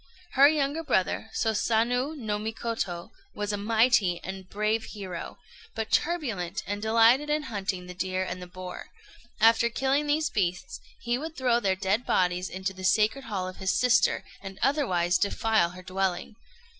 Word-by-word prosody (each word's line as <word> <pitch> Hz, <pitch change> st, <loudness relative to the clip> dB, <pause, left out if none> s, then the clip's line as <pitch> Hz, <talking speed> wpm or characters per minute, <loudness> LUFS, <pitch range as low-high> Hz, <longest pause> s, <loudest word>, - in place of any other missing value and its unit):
Her 275 Hz, +1 st, +7 dB
younger 295 Hz, +1 st, 0 dB
brother, 220 Hz, -, 0 dB
Sosanöô 235 Hz, +6 st, +1 dB
no 210 Hz, -5 st, -2 dB
Mikoto, 220 Hz, -5 st, -4 dB, 0.2 s
was 210 Hz, 0 st, -2 dB
a -, -, +1 dB
mighty 215 Hz, -3 st, +2 dB
and 190 Hz, +2 st, -5 dB
a 190 Hz, -, -11 dB
brave 215 Hz, +3 st, -1 dB
hero, 190 Hz, -5 st, -7 dB, 0.4 s
but 220 Hz, -1 st, -3 dB
turbulent, 220 Hz, -, -1 dB
and 205 Hz, +2 st, -4 dB
delighted 230 Hz, +6 st, +4 dB
in 300 Hz, 0 st, +1 dB
hunting 195 Hz, -6 st, -3 dB
the 180 Hz, -, -8 dB
deer 185 Hz, +1 st, -2 dB
and 180 Hz, 0 st, -5 dB
the 180 Hz, -, -8 dB
boar. 180 Hz, 0 st, -8 dB, 0.5 s
After 230 Hz, +1 st, +5 dB
killing 270 Hz, +4 st, 0 dB
these 300 Hz, +1 st, +1 dB
beasts, 180 Hz, -2 st, -2 dB, 0.2 s
he 240 Hz, +1 st, -1 dB
would 320 Hz, +2 st, -7 dB
throw 250 Hz, -2 st, +2 dB
their 195 Hz, -4 st, +1 dB
dead 195 Hz, +5 st, 0 dB
bodies 180 Hz, -2 st, +1 dB
into 190 Hz, +1 st, -4 dB
the 185 Hz, 0 st, -10 dB
sacred 215 Hz, +7 st, +2 dB
hall 195 Hz, -5 st, -3 dB
of 185 Hz, -, -8 dB
his 190 Hz, -1 st, 0 dB
sister, 250 Hz, +1 st, +3 dB, 0.2 s
and 195 Hz, -1 st, -8 dB
otherwise 185 Hz, -, +2 dB
defile 215 Hz, -3 st, +2 dB
her 180 Hz, +1 st, -11 dB
dwelling. 185 Hz, +2 st, -2 dB
210 Hz, 165 wpm, -27 LUFS, 185-240 Hz, 0.5 s, Her